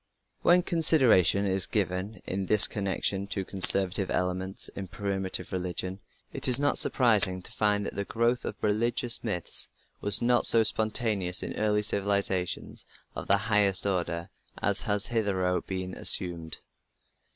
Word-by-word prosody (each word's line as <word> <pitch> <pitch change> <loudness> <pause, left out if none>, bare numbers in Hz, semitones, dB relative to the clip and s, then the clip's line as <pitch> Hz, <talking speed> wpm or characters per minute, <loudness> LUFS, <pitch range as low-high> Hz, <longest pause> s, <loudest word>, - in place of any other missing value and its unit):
When 175 +1 +2
consideration 130 - +2
is 95 -1 0
given 95 0 -5
in 95 0 -5
this 105 +1 +6
connection 100 -1 -4
to 100 -1 -5
the - - -16
conservative 95 0 +4
element 90 +1 -5
in 95 -1 -8
primitive 95 0 -6
religion, 90 +1 -6 0.3
it - - +3
is 125 -1 +5
not 145 +1 +1
surprising 100 -7 +3
to - - -7
find 105 -1 -2
that - - -6
the 100 - -5
growth 115 +4 -2
of - - -6
religious 115 +3 +1
myths 95 -7 +4 0.3
was 105 +1 +4
not 120 0 +2
so 115 -1 +4
spontaneous 110 -4 0
in - - -4
early 105 -1 -2
civilizations 100 -3 -2 0.3
of - - -8
the 100 - +3
highest 100 -1 +1
order 85 -3 -4 0.3
as 100 -1 +3
has 105 0 -1
hitherto 95 -6 -2
been 95 -1 -6
assumed. 85 -4 0
100 Hz, 145 wpm, -26 LUFS, 95-110 Hz, 0.3 s, this